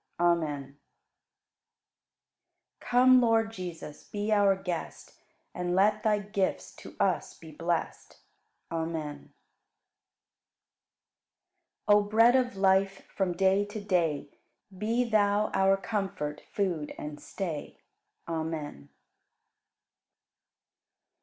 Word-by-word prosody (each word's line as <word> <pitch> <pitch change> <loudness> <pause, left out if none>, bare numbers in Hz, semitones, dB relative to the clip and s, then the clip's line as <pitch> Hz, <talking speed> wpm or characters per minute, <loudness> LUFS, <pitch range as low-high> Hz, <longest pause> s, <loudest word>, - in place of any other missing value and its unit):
Amen. 165 -4 +1 2.2
40. - - -17
Come, 255 +1 +6
Lord 225 -1 +2
Jesus, 175 -7 -8
be 205 +1 -4
our 200 -2 +4
Guest 180 -3 -6 0.3
And 180 0 -2
let 210 +3 +3
Thy 215 -1 +2
gifts 200 -2 -2
to - - -12
us - - 0
be 160 -1 -12
blest. 165 +2 -3 0.5
Amen. 160 -3 -4 2.5
41. - - -49
O 205 0 +7
Bread 225 +4 +4
of 250 -4 +1
Life, 195 0 +2
from 190 -3 0
day 190 +2 +3
to 205 +1 -7
day 170 -8 0 0.5
Be 225 +5 0
Thou 210 -1 +2
our 195 0 +3
Comfort, 190 -8 -3
Food, 175 -7 -2
and 150 0 -7
Stay. 165 -7 -5 0.5
Amen. 160 - -4
195 Hz, 95 wpm, -29 LUFS, 165-210 Hz, 2.5 s, O